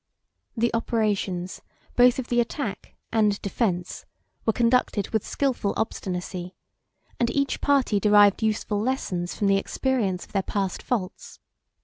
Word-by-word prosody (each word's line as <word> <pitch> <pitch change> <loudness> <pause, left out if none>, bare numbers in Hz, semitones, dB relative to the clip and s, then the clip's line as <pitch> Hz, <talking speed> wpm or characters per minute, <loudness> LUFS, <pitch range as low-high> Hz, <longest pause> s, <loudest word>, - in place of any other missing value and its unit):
The 235 +1 +1
operations, 205 -6 -1 0.3
both 245 0 +6
of 260 -2 -4
the 240 - +2
attack 240 -2 -3 0.2
and 210 -2 +2
defence, 185 -4 -2 0.4
were - - +6
conducted 230 -3 +1
with 220 -3 0
skilful 255 -7 -1
obstinacy; 180 -3 -4 0.6
and 235 - +2
each 280 +1 -1
party 270 -7 +2
derived 205 0 +5
useful 215 -1 0
lessons 195 -8 -2
from 205 - -1
the 195 0 +4
experience 200 -4 -1
of - - -23
their 195 - +1
past 195 -1 -2
faults. 200 -7 -4
210 Hz, 130 wpm, -25 LUFS, 195-240 Hz, 0.6 s, both